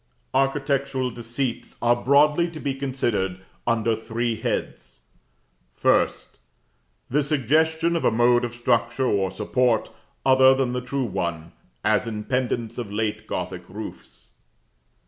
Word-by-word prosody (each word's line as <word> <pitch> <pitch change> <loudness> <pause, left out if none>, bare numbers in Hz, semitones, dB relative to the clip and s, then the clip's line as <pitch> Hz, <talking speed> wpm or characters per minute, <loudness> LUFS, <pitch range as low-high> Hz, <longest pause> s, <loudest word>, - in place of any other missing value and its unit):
Architectural 135 -1 0
Deceits 120 +2 -4
are 120 0 +3
broadly 150 +7 +3
to 165 -2 -9
be 140 -2 -2
considered 120 -9 -1 0.3
under 115 -1 +2
three 115 +1 -2
heads: - - -4 0.8
1st. - - +1 0.7
The 150 +3 +3
suggestion 160 +4 +2
of 165 - -1
a - - +5
mode 120 +1 +3
of 120 -1 -3
structure 120 +1 +1
or 100 -5 +1
support, 110 +4 0 0.3
other 130 0 +6
than 130 -2 0
the 125 - -2
true 130 +1 -2
one; 85 -5 -3 0.3
as 105 0 +2
in 105 -2 -4
pendants 120 -2 -2
of 110 -4 -5
late 105 0 -2
Gothic - - -5
roofs. - - -10
120 Hz, 125 wpm, -24 LUFS, 110-135 Hz, 0.8 s, other